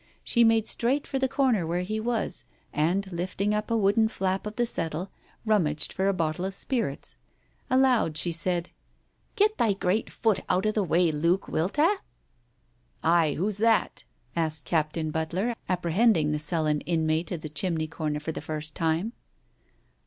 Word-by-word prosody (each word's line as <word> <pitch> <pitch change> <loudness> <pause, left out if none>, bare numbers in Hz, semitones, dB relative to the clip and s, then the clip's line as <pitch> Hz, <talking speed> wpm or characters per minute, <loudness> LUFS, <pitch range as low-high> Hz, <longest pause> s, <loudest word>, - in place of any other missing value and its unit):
She 235 - +3
made 225 -1 +3
straight 265 +5 +1
for 270 - -2
the 265 - +2
corner 245 - +1
where 175 +2 -1
he 215 +4 -3
was, 230 0 0 0.3
and 170 +7 +1
lifting 185 +4 -1
up 210 0 -2
a 230 - +2
wooden 215 +2 +3
flap 195 -1 -2
of 210 - -7
the 240 - +1
settle, 170 -2 -2 0.3
rummaged 170 -9 +1
for 190 +1 0
a - - +4
bottle 165 -1 -1
of 190 +1 -2
spirits. 225 - -3 0.5
Aloud 255 - +3
she 170 +3 +3
said 170 +1 -1 0.3
— - - -43
"Get 430 0 +2
thy 220 -3 +3
great 195 +2 0
foot 220 -5 +1
out 185 +2 +2
of 215 - +2
the 210 - +1
way, 170 -1 +2
Luke, 170 +5 +1
wilt 170 - -1
'a! 335 +8 +4 0.6
" 120 0 -40
"Ay, 165 -2 +3
who's 200 +3 0
that?" 225 0 +2 0.3
asked 155 -4 -1
Captain 155 +1 -1
Butler, 170 +9 -1 0.2
apprehend 185 +5 +3
ing 150 -1 +1
the 150 - -1
sullen 150 -1 0
inmate 160 0 0
of 170 -3 -3
the 155 - -6
chimney 160 +1 -1
corner 155 -2 -3
for 155 +2 -4
the - - -6
first 155 0 -5
time. 165 +7 -1
180 Hz, 175 wpm, -27 LUFS, 160-215 Hz, 0.6 s, a